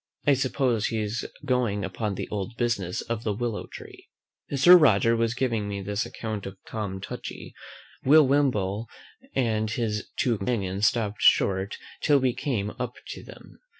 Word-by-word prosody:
I 145 Hz, -, +5 dB
suppose 130 Hz, -4 st, +1 dB
he 115 Hz, -, -2 dB
is 105 Hz, +2 st, -2 dB, 0.2 s
going 120 Hz, -7 st, 0 dB
upon 100 Hz, +2 st, -3 dB
the -, -, -4 dB
old 105 Hz, +3 st, -4 dB
business 110 Hz, -7 st, -1 dB
of 115 Hz, -1 st, -4 dB
the 105 Hz, -, 0 dB
willow 115 Hz, -1 st, -3 dB
tree. -, -, -12 dB, 0.4 s
As 140 Hz, -1 st, -2 dB
Sir 180 Hz, +1 st, +11 dB
Roger 115 Hz, -, +5 dB
was 115 Hz, +1 st, 0 dB
giving 115 Hz, -5 st, -1 dB
me 100 Hz, -1 st, -3 dB
this 105 Hz, +3 st, -2 dB
account 110 Hz, -4 st, -5 dB
of 95 Hz, 0 st, -9 dB
Tom 100 Hz, -3 st, -4 dB
Touchy, 95 Hz, -, -7 dB, 0.5 s
Will 150 Hz, +3 st, +7 dB
Wimble 115 Hz, -7 st, +1 dB, 0.5 s
and 110 Hz, -4 st, +1 dB
his 110 Hz, -2 st, -2 dB
two 120 Hz, -3 st, +1 dB
companions 100 Hz, -2 st, 0 dB
stopped 105 Hz, 0 st, -1 dB
short 95 Hz, 0 st, +3 dB, 0.2 s
till 145 Hz, -2 st, +4 dB
we 130 Hz, -2 st, +1 dB
came 105 Hz, -8 st, -2 dB
up 125 Hz, -1 st, -3 dB
to -, -, -7 dB
them. -, -, -14 dB
110 Hz, 165 wpm, -26 LUFS, 100-125 Hz, 0.5 s, Sir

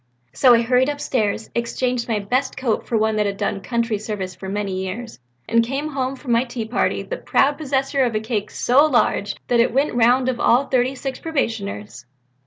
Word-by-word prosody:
So 245 Hz, -, +6 dB
I 230 Hz, -, +2 dB
hurried 250 Hz, +3 st, +3 dB
upstairs, 225 Hz, -7 st, -2 dB
exchanged 240 Hz, +1 st, -1 dB
my 225 Hz, -3 st, 0 dB
best 250 Hz, +7 st, -1 dB
coat 250 Hz, -4 st, -1 dB
for 230 Hz, -, +1 dB
one 220 Hz, 0 st, +1 dB
that 210 Hz, -1 st, +2 dB
had 200 Hz, 0 st, -3 dB
done 195 Hz, -, -2 dB
country 230 Hz, -1 st, -1 dB
service 200 Hz, -4 st, -4 dB
for 190 Hz, +2 st, -8 dB
many 195 Hz, -2 st, -2 dB
years 220 Hz, -, -6 dB, 0.3 s
and 230 Hz, 0 st, +3 dB
came 275 Hz, +6 st, -3 dB
home 270 Hz, -2 st, -2 dB
from 260 Hz, -2 st, -6 dB
my 235 Hz, +1 st, +4 dB
tea 240 Hz, -3 st, -5 dB
party 220 Hz, -, 0 dB
the -, -, -5 dB
proud 285 Hz, -, +1 dB
possessor 275 Hz, -1 st, 0 dB
of 235 Hz, -3 st, 0 dB
a -, -, +2 dB
cake 215 Hz, -2 st, -3 dB
so 260 Hz, +4 st, +3 dB
large 220 Hz, -6 st, +1 dB
that 240 Hz, -, +2 dB
it 235 Hz, -, +3 dB
went 280 Hz, +3 st, +2 dB
the -, -, -4 dB
round 245 Hz, +2 st, +4 dB
of 255 Hz, -2 st, -1 dB
all 245 Hz, +4 st, +4 dB
the 275 Hz, -, -16 dB
thirty 255 Hz, +1 st, +2 dB
six 265 Hz, 0 st, -5 dB
probationers." 200 Hz, -, -3 dB
240 Hz, 210 wpm, -21 LUFS, 215-260 Hz, 0.3 s, So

